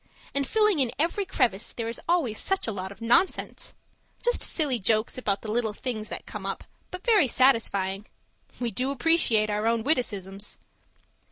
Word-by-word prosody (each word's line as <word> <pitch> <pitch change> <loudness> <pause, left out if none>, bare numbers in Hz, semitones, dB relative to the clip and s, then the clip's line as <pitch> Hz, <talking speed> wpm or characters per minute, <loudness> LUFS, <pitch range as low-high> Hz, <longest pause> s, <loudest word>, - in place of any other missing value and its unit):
And 280 -1 0
filling 425 -4 +3
in 255 -4 +2
every 340 +6 0
crevice, 245 - 0
there 230 -1 -4
is 230 - -5
always 295 -12 +1
such 385 0 +1
a 225 - -1
lot 190 -2 -5
of 200 - -13
nonsense 245 +11 +1 0.5
just 485 0 +2
silly 285 -7 +1
jokes 215 +2 +1
about 205 -6 -1
the 215 - -4
little 225 -1 +1
things 215 -2 -4
that - - -6
come - - -7
up - - -4 0.3
but 365 +1 -8
very 425 - +5
satisfying. 210 -6 +2 0.5
We 240 -2 -2
do 255 +6 -2
appreciate 245 -7 +3
our 210 +2 0
own 230 -1 +1
witticisms! 205 - -2
235 Hz, 170 wpm, -26 LUFS, 215-300 Hz, 0.5 s, very